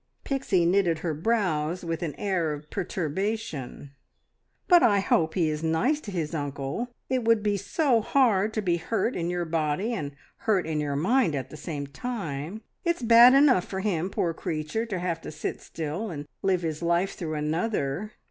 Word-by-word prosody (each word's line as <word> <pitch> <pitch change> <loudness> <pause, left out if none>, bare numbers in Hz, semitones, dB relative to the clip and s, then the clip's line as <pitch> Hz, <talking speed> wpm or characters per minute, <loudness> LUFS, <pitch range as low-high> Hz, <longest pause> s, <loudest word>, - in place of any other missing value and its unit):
Pixie 255 -11 +1
knitted 175 -2 +2
her 165 - 0
brows 175 -2 0
with 165 -1 -3
an 160 -4 -3
air 175 -6 0
of 150 +1 -10
perturbation. 180 - -3 0.8
"But 355 -2 +7
I 205 -3 +5
hope 160 -4 +1
he 175 -4 +2
is 155 0 -2
nice 235 - +1
to 215 - -8
his 170 -5 -3
uncle. 145 - -3 0.2
It 260 -2 0
would 225 -2 +3
be 205 -1 +2
so 235 - +1
hard 220 -5 +3
to 215 - -1
be 175 -3 +2
hurt 220 +7 -1
in 170 -1 -1
your 175 -1 -1
body 160 +7 -1
and 145 -10 -4 0.2
hurt 205 -5 +1
in 155 -1 -1
your 145 -1 -1
mind 180 - +2
at 135 - -4
the - - -8
same 150 -1 -5
time. 165 - -5 0.2
It's 340 -7 0
bad 235 +3 +8
enough 275 -10 +5
for 190 -1 -4
him, 185 -3 0
poor 170 -3 -1
creature, 160 +9 -3
to 200 -4 -3
have 175 -2 -2
to - - -7
sit 150 0 -4
still 165 +7 -4
and 145 -4 -6
live 185 -2 +1
his 160 -1 -3
life 170 +3 +1
through 160 -4 -4
another. 160 +4 -1
175 Hz, 185 wpm, -27 LUFS, 155-215 Hz, 0.8 s, bad